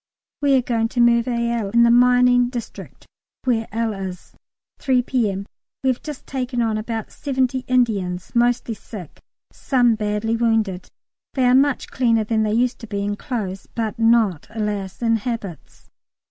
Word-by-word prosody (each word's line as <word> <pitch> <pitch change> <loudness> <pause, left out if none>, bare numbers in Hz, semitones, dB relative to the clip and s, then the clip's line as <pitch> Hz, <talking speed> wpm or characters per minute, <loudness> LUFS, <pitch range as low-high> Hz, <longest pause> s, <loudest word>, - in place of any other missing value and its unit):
We 280 -1 +4
are 255 - +1
going 230 -2 0
to 240 - -4
Merville 235 -2 +2
in 235 +3 +4
the 235 - +5
mining 245 0 +5
district 240 -2 -8 0.4
where 230 -3 0
L. 225 0 -1
is. 190 -3 -7 0.5
3 255 -3 +2
P.M. 210 -7 -1 0.4
We 265 - +4
have 250 - -5
just 300 -4 -8
taken 255 -2 -3
on 225 -2 +1
about 225 +1 -4
seventy 260 -2 -1
Indians, 200 -8 0
mostly 240 -1 +1
sick, 200 -6 -11 0.3
some 245 -4 +2
badly 215 +1 -1
wounded. 225 -5 0 0.5
They 260 -2 +2
are 250 - +5
much 275 +1 +2
cleaner 230 -4 +2
than 220 +1 0
they 215 -1 0
used 245 +2 +1
to 230 - -9
be, 200 -1 -3
in 205 0 -1
clothes, 200 -5 -5
but 225 0 -3
not, 225 -8 +3
alas! 210 -2 -4
in 230 -1 +3
habits. 215 -6 -7
230 Hz, 160 wpm, -21 LUFS, 210-245 Hz, 0.5 s, the